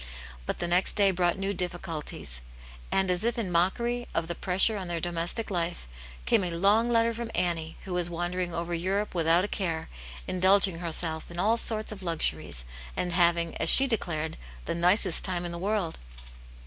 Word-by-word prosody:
But - - -2
the 175 - -3
next 180 +2 +4
day 200 -2 +4
brought 175 0 0
new 195 +1 -2
difficulties, 165 - -4 0.5
and. 190 -1 +2
as 180 +2 +1
if 235 +1 -1
in 205 -6 -3
mockery 235 +8 0
of 165 0 -1
the 170 - -3
pressure 190 +5 +4
on 190 -3 -5
their 170 -1 -2
domestic 175 +6 0
life, 170 - -3 0.4
came 190 - +2
a 180 - -2
long 200 +7 +2
letter 230 0 +2
from 230 0 -6
Annie, 165 -2 -2
who 190 - -6
was 175 -1 +1
wandering 175 +1 -3
over 170 +1 -4
Europe 190 +5 -2
without 170 +1 +2
a - - -4
care, 170 -6 -3 0.4
indulging 190 -1 +4
herself 160 -2 -3
in 170 - -9
all 215 +6 +2
sorts 220 -2 0
of 205 -2 -8
luxuries, 75 - -1 0.3
and 180 -1 -2
having, 170 -1 +2
as 165 - 0
she 270 - +8
declared, 170 - -2 0.3
the - - -2
nicest 180 +2 +3
time 180 -2 +1
in 175 - -3
the 170 - -6
world. 195 -3 -2
175 Hz, 185 wpm, -27 LUFS, 170-200 Hz, 0.5 s, she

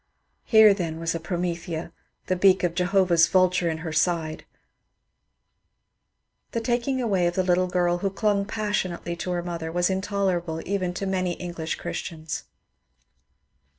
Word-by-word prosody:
Here 220 -2 +7
then 165 -5 -3
was 165 0 -1
a 165 - -3
Promethea 170 -1 -3 0.2
— - - -49
the 185 - 0
beak 190 0 +4
of 175 -2 +1
Jehovah's 180 -1 +3
vul 185 -1 +4
ture 180 -2 0
in 160 - -2
her 160 - -3
side! 160 -1 0 2.1
The 230 - 0
taking 240 +3 0
away 195 -8 +1
of 175 - -2
the 185 - +2
little 180 0 +2
girl, 175 -1 +1
who 195 - 0
dung 200 0 0
passionately 200 -5 -2
to 180 - -4
her 175 -1 -1
mother, 170 -2 -4
was 175 +2 +1
intolerable 190 -4 -1
even 185 -2 -1
to 195 - -3
many 185 -2 0
English 170 -2 -4
Chris 175 - -4
tians. 155 -1 -6
180 Hz, 155 wpm, -25 LUFS, 170-195 Hz, 2.1 s, Here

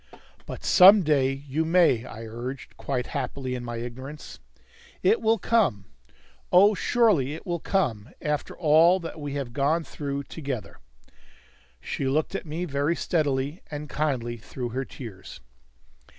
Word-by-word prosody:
"But - - -7
some 195 +2 +8
day 140 -4 +2
you 140 +3 -3
may," 160 -8 +3
I 115 -3 -9
urged, 120 +4 -7
quite 125 -3 -3
happily 135 -2 -3
in 125 -1 -4
my 120 -1 -5
ignorance. 130 +5 -8 0.6
"It 450 - +3
will 225 +1 +3
come. 195 - +1 0.7
Oh, 200 +4 +7
surely 195 - +2
it 160 - -11
will 175 -2 -2
come, 130 - -1
after 150 -1 -3
all 165 +3 +5
that 165 -1 -7
we 145 -1 -5
have 135 -4 -4
gone 150 +5 +1
through 140 -2 -5
together!" 130 - -6 1.0
She 135 - -3
looked 150 +6 0
at 195 - -4
me 165 +4 -3
very 145 +1 0
steadily 145 -1 -1
and 150 0 -6
kindly 130 -6 -2
through 120 +2 -6
her 130 +3 -3
tears. 95 - -10
140 Hz, 145 wpm, -26 LUFS, 125-165 Hz, 1.0 s, some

